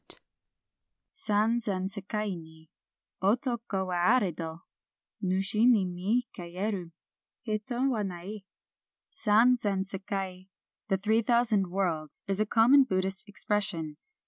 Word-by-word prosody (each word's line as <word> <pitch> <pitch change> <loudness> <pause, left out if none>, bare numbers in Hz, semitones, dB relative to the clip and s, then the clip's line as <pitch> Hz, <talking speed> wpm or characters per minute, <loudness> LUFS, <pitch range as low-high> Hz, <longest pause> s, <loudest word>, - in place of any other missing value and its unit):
^ - - +3
^ - - -17 0.9
San 225 - +1
zen 195 -5 -2
sdkai 205 0 -3
ni 160 -1 -14 0.5
Otoko 225 -1 0
wa 175 -1 -1 0.2
arddo, 165 -5 -4 0.6
NusM 195 +4 +2
ni 195 -3 +1
mi 195 +8 -1
kayeru 180 0 -4 0.5
Hito 240 +3 -1
wa 240 -5 0
nai. 195 +2 -5 0.7
"San 235 +4 +4
zen 195 -3 0
sekai," 190 -1 -5 0.4
the 195 - +1
three 220 +4 +2
thousand 230 -4 +2
worlds, 175 -5 -2
is 195 0 -2
a 215 - +1
common 245 +6 +6
Buddhist 190 -3 -1
expression. 200 -7 0
200 Hz, 120 wpm, -29 LUFS, 185-220 Hz, 0.9 s, common